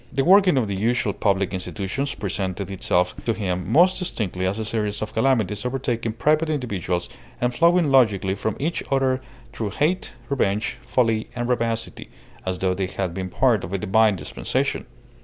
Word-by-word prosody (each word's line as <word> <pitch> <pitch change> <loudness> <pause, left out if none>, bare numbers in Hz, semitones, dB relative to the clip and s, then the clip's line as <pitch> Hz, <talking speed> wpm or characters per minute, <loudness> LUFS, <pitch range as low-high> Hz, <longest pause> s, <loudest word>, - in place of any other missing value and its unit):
The 135 +1 0
working 185 -3 +6
of 120 -4 +2
the 100 - -2
usual 110 0 +1
public 100 -1 0
institutions 100 +8 -3
presented 95 -1 -3
itself 90 -1 +1
to 115 - +1
him 90 -4 -2
most 180 +5 +5
distinctly 95 - -2
as 95 +3 -1
a 110 - -3
series 105 -2 -2
of 110 - -6
calamities 110 -4 +1
overtaking 120 -3 -2
private 155 +7 +2
individuals 100 - -2 0.3
and 125 0 0
flowing 170 0 +4
logically 105 -8 +4
from 110 +1 -2
each 165 +4 -1
other 135 -1 +1 0.3
through 110 -3 -3
hate, 155 - -1
revenge, 120 -2 0
folly, 115 -3 +1
and 120 -1 -2
rapacity, 115 -2 -2 0.4
as 95 -1 -1
though 95 0 +1
they 95 0 -2
had 95 -2 -3
been 95 +1 -4
part 115 -1 +2
of 90 - -6
a - - +1
divine 105 +2 +3
dispensation. - - -2
110 Hz, 170 wpm, -23 LUFS, 95-130 Hz, 0.4 s, working